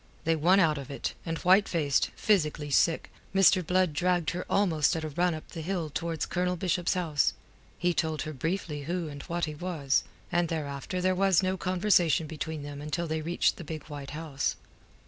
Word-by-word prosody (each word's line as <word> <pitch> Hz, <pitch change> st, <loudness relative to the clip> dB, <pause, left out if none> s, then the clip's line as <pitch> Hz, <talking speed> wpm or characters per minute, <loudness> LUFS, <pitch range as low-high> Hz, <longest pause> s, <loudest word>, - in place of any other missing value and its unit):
They 165 Hz, 0 st, +2 dB
won 175 Hz, +5 st, +4 dB
out 155 Hz, -5 st, +3 dB
of 135 Hz, -, -8 dB
it, 140 Hz, -, -3 dB
and 165 Hz, 0 st, -1 dB
white 190 Hz, +4 st, +4 dB
faced, 150 Hz, -5 st, +1 dB
physically 155 Hz, -7 st, +1 dB
sick, 165 Hz, +4 st, +2 dB, 0.2 s
Mr. 190 Hz, -1 st, +6 dB
Blood 180 Hz, -1 st, +2 dB
dragged 175 Hz, 0 st, +1 dB
her 180 Hz, -, -5 dB
almost 165 Hz, -8 st, +2 dB
at 160 Hz, -, -3 dB
a 155 Hz, -, -3 dB
run 175 Hz, +3 st, +1 dB
up 155 Hz, -, -10 dB
the 165 Hz, -, -6 dB
hill 170 Hz, -2 st, -2 dB
towards 165 Hz, +1 st, -2 dB
Colonel 180 Hz, 0 st, -1 dB
Bishop's 180 Hz, 0 st, 0 dB
house. 160 Hz, -6 st, +1 dB, 0.4 s
He 175 Hz, 0 st, +1 dB
told 160 Hz, -2 st, -1 dB
her 155 Hz, 0 st, -5 dB
briefly 155 Hz, -1 st, -3 dB
who 170 Hz, 0 st, -2 dB
and 145 Hz, -1 st, -8 dB
what 170 Hz, +3 st, -2 dB
he 155 Hz, -, -5 dB
was, 150 Hz, -4 st, 0 dB, 0.3 s
and 175 Hz, 0 st, +2 dB
thereafter 150 Hz, +2 st, -3 dB
there 185 Hz, +1 st, +2 dB
was 190 Hz, -1 st, +3 dB
no 185 Hz, 0 st, +1 dB
conversation 180 Hz, -3 st, +2 dB
between 155 Hz, 0 st, -5 dB
them 145 Hz, 0 st, -7 dB
until 150 Hz, +3 st, -2 dB
they 160 Hz, -1 st, -2 dB
reached 170 Hz, +3 st, +1 dB
the -, -, -7 dB
big 155 Hz, -1 st, -6 dB
white 145 Hz, -2 st, -7 dB
house. 155 Hz, -4 st, -2 dB
165 Hz, 195 wpm, -29 LUFS, 150-180 Hz, 0.4 s, Mr